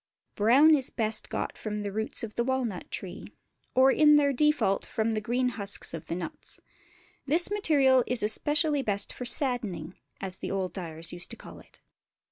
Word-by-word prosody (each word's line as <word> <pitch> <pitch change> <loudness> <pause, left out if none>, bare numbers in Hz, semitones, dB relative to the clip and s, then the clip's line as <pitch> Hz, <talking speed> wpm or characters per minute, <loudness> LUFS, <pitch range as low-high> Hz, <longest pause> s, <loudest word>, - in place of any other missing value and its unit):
Brown 260 +9 +5
is 270 -4 +1
best 220 -2 -1
got - - -4
from 210 -1 -4
the 200 - -4
roots 220 +3 -3
of 220 -2 -6
the 235 - -1
walnut 245 -7 -2
tree, - - -6 0.5
or 260 +1 +6
in 300 +1 +5
their 285 -1 +3
default 300 -8 +1
from 220 0 -2
the 215 -1 -2
green 250 +3 0
husks 205 -7 -2
of 165 -1 -7
the 170 - -3
nuts. 175 -2 -7 0.7
This 330 +7 +3
material 280 -10 +3
is 250 -2 +2
especially 295 +7 +2
best 205 -5 -1
for 250 - -7
"saddening," 225 - -1 0.3
as 190 -1 -6
the - - -6
old 190 -2 -2
dyers 165 -3 -6
used 175 0 -8
to - - -9
call - - -12
it. - - -21
230 Hz, 180 wpm, -28 LUFS, 200-270 Hz, 0.7 s, or